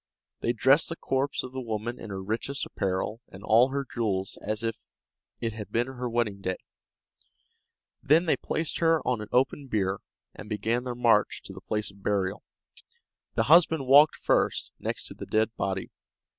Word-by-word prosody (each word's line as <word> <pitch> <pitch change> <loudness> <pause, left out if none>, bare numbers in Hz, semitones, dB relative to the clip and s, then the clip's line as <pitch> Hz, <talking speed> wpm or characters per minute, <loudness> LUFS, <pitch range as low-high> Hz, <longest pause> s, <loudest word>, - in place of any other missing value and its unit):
They 120 - +1
dressed 130 +6 +4
the 165 - -3
corpse 135 -2 -1
of 130 - -7
the 130 0 -5
woman 115 +1 -4
in 115 - -8
her 95 -1 -5
richest 115 +7 -3
apparel 100 +3 -2
and 95 +1 -12
all 115 +4 +5
her 140 +1 -2
jewels 100 -6 -2
as 110 +2 -2
if 115 0 -1 0.6
it 115 -2 -2
had 110 -2 -8
been 120 +1 +1
her 125 -1 -5
wedding 110 -4 -1
day; 95 -1 -2 1.4
then 160 +5 +4
they 160 - +3
placed 160 -1 -3
her 165 -1 +2
on 125 -4 +1
an 105 - -7
open 135 +2 +1
bier, 100 -4 0 0.3
and 105 - -10
began 115 +3 -1
their 125 -1 -3
march 115 -3 +2
to - - -8
the - - -10
place 105 -1 -3
of 100 0 -19
burial. 95 -2 0 0.9
The - - +3
husband 160 -2 +5
walked 140 +3 +7
first, - - +1
next - - -4
to - - -7
the - - -9
dead 110 +1 +1
body. 95 -1 -3
115 Hz, 180 wpm, -28 LUFS, 105-130 Hz, 1.4 s, walked